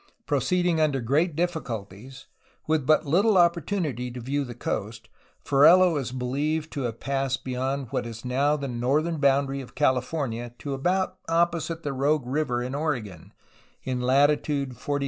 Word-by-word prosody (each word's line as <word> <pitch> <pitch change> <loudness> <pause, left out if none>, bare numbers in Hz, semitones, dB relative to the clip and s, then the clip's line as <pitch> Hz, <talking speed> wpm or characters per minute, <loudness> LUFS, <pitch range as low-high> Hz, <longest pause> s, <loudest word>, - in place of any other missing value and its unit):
Proceeding 175 -3 +1
under 145 -3 +2
great 145 +7 +1
difficulties, 130 - -4 0.4
with 155 -4 0
but 155 - +4
little 195 +9 +3
opportun 175 +1 +2
ity 125 -3 -4
to 125 +1 -7
view 140 +4 -2
the 120 -3 -8
coast, 110 -1 -4 0.4
Ferrelo 170 +5 +6
is 135 -4 -2
believed 145 +5 -2
to 140 - -3
have 115 - -10
passed 135 -1 -2
beyond 130 0 -3
what 120 - -2
is 115 +1 -9
now 140 +4 +2
the 140 -1 -4
northern 140 +7 0
boundary 140 -1 +2
of 130 - -13
California 125 -3 -1
to 140 - -5
about 180 +8 -1
opposite 165 0 0
the 145 - -2
Rogue 140 +1 +1
River 125 -2 -1
in 125 +2 -5
Oregon, 125 - -3 0.5
in 125 -1 -2
latitude 140 +1 +2
42° 125 - -13
30'. 145 +3 -2
140 Hz, 160 wpm, -26 LUFS, 125-155 Hz, 0.5 s, Ferrelo